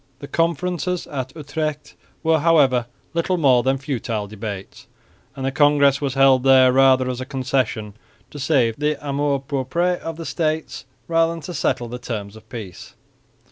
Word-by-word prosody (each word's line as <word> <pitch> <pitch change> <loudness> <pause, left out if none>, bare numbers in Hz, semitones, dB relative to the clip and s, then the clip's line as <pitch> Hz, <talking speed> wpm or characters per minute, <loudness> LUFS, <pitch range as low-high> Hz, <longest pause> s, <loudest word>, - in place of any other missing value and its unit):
The 140 - -9
conferences 175 +2 -1
at 130 -2 -5
Utrecht 155 0 -4 0.3
were, 160 -1 +3
however, 140 -7 +3 0.3
little 170 +2 0
more 130 -6 +4
than 135 +2 +1
futile 120 -6 -3
debates; 100 -2 -8 0.5
and 135 - -5
the 135 - 0
congress 145 -1 +4
was 140 -2 -2
held 135 -1 +5
there 130 -1 +6
rather 130 -1 +4
as 125 0 -3
a - - -2
concession 130 -5 -2 0.4
to 145 - -8
save 130 -6 +1
the 150 +1 0
amour 140 0 0
propre 160 +6 0
of 165 -1 -6
the 165 - -7
States 155 -1 -2 0.2
than 165 0 +1
to 180 - -7
settle 125 -5 -1
the 125 +1 -7
terms 105 -4 -5
of 110 0 -16
peace. 105 -8 -9
135 Hz, 160 wpm, -21 LUFS, 125-155 Hz, 0.5 s, there